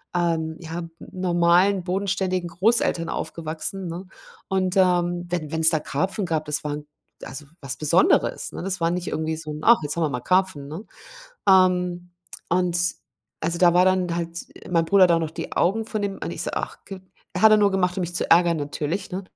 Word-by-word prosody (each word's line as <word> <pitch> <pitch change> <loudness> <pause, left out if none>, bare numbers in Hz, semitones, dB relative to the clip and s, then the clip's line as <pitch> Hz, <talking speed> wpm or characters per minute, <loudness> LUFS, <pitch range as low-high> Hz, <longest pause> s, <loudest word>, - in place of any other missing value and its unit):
ähm, 165 -2 0
ja, 165 0 -6 0.2
normalen, 180 +1 +2
bodenständigen 185 -1 -1
Großeltern 180 -2 +1
aufgewachsen, 165 +4 -4
ne, 175 +3 -6 0.4
und, 190 0 0
ähm, 175 -1 +2
wenn 165 -4 -3
wenn's 160 0 +1
da 160 - +1
Karpfen 190 +8 -2
gab, 160 -2 -1
das 150 0 -2
war 145 0 -3 0.5
also 150 +2 -8 0.2
was 135 -1 -4
Besonderes, 155 - +2
ne? - - -7
Das 190 -1 -3
war 165 - +2
nicht 180 0 -3
irgendwie 160 0 -2
so 155 -1 -7
'n: 150 - -6
„Ach, 235 0 +6
jetzt 145 - -3
haben 165 - +1
wir 155 - +1
mal 125 -3 -4
Karpfen”, 185 -4 +1
ne? 165 +9 -7 0.6
Ähm, 180 -2 +3 0.4
und 175 0 +1 0.6
also 170 +2 -1
da 175 -1 +5
war 180 - +5
dann 185 -2 +1
halt 170 0 -4 0.3
mein 165 -2 +2
Bruder 200 0 +6
hat 175 - +4
auch 165 - +3
noch 160 -1 -3
die - - -7
Augen 210 +6 +1
von 215 -1 -3
dem 200 -1 -2
und - - -3
ich - - -5
so: - - -3
„Ach, - - -4
gib” 190 -1 -9 0.3
hat 215 +3 +6
er - - +7
nur 205 -1 +4
gemacht, 180 -1 0
um 190 - -1
mich 175 0 -5
zu - - -2
ärgern 170 0 +5
natürlich, 150 +5 -3
ne, 190 +2 -3
175 Hz, 200 wpm, -23 LUFS, 165-185 Hz, 0.6 s, er